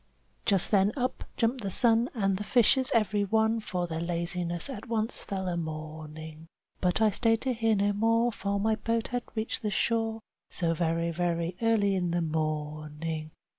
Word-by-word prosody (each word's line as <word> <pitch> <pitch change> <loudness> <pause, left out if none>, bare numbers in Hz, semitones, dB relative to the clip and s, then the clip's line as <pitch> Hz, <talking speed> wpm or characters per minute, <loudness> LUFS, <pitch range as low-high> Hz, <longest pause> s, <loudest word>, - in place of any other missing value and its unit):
Just 195 -5 +3
then 200 -1 +4
up 255 0 -2
jumped 240 +2 +1
the 200 - -2
sun, 230 +4 +3
and 195 -4 +1
the 205 - -4
fishes 255 +3 +4
every 210 -2 +2
one 220 +2 +2
For 180 -5 -2
their 165 -1 -4
laziness 170 0 -1
at 265 -1 -7
once 225 0 -1
fell 190 -2 -3
a 175 - -1
mourning. 155 0 -6 0.3
But 180 +3 +1
I 215 - +5
stayed 225 +2 +2
to 260 -1 0
hear 225 -1 +2
no 205 0 +2
more, 230 +3 +2
for 200 -1 -2
my 220 +2 +2
boat 230 +1 -1
had 245 -1 -1
reached 220 +2 -2
the 215 - -1
shore, 225 +2 0 0.3
So 165 -3 +1
very, 165 0 0
very 170 0 -1
early 220 -3 +3
in 180 -2 0
the 175 +1 0
morning. 155 0 -3
195 Hz, 175 wpm, -29 LUFS, 170-225 Hz, 0.3 s, I